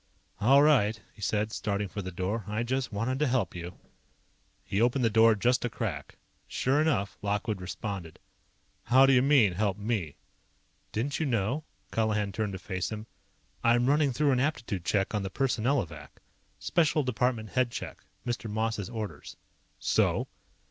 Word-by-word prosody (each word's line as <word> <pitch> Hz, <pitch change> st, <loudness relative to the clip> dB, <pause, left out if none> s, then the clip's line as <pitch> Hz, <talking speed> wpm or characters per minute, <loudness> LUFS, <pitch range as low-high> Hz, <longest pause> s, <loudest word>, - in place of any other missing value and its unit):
"All 135 Hz, +6 st, +6 dB
right," 115 Hz, -8 st, +4 dB
he -, -, -16 dB
said, 105 Hz, +2 st, 0 dB
starting 100 Hz, -1 st, -2 dB
for 100 Hz, +2 st, -5 dB
the 95 Hz, -, -5 dB
door. 95 Hz, +5 st, -2 dB
"I 105 Hz, +3 st, -1 dB
just 130 Hz, +1 st, -2 dB
wanted 115 Hz, +6 st, -1 dB
to 150 Hz, -, +2 dB
help 120 Hz, -8 st, 0 dB
you." 85 Hz, 0 st, -7 dB, 0.9 s
He 100 Hz, -, -1 dB
opened 125 Hz, +1 st, +2 dB
the 115 Hz, -, +2 dB
door 115 Hz, 0 st, +6 dB
just 125 Hz, +5 st, +2 dB
a 120 Hz, -, 0 dB
crack. 85 Hz, -14 st, -5 dB, 0.3 s
Sure 135 Hz, +4 st, +1 dB
enough, 110 Hz, -11 st, 0 dB
Lockwood 105 Hz, 0 st, -1 dB
responded. 95 Hz, -2 st, -5 dB, 0.7 s
"How 130 Hz, +3 st, +6 dB
do 135 Hz, -, +5 dB
you 125 Hz, -, +6 dB
mean, 130 Hz, -8 st, +4 dB
help 100 Hz, +1 st, 0 dB
me?" 105 Hz, -8 st, -2 dB, 0.8 s
"Didn't 135 Hz, +6 st, -2 dB
you 160 Hz, -, 0 dB
know?" 125 Hz, +5 st, 0 dB, 0.3 s
Colihan 105 Hz, -2 st, 0 dB
turned 105 Hz, 0 st, -2 dB
to -, -, -4 dB
face 95 Hz, +1 st, -4 dB
him. 110 Hz, 0 st, -5 dB, 0.6 s
"I'm 120 Hz, +1 st, +4 dB
running 145 Hz, +1 st, +3 dB
through 145 Hz, +3 st, +2 dB
an 125 Hz, -, +2 dB
aptitude 120 Hz, -, -2 dB
check 100 Hz, +1 st, +1 dB
on 105 Hz, -, 0 dB
the 95 Hz, -, -3 dB
Personnelovac. 110 Hz, -, -1 dB, 0.4 s
Special 155 Hz, -3 st, +1 dB
department 125 Hz, -3 st, 0 dB
head 125 Hz, +1 st, +1 dB
check. -, -, -7 dB, 0.2 s
Mr. 120 Hz, -2 st, -3 dB
Moss's 110 Hz, -1 st, -2 dB
orders." 110 Hz, -3 st, -6 dB, 0.4 s
"So?" -, -, +1 dB
110 Hz, 160 wpm, -29 LUFS, 100-130 Hz, 0.9 s, All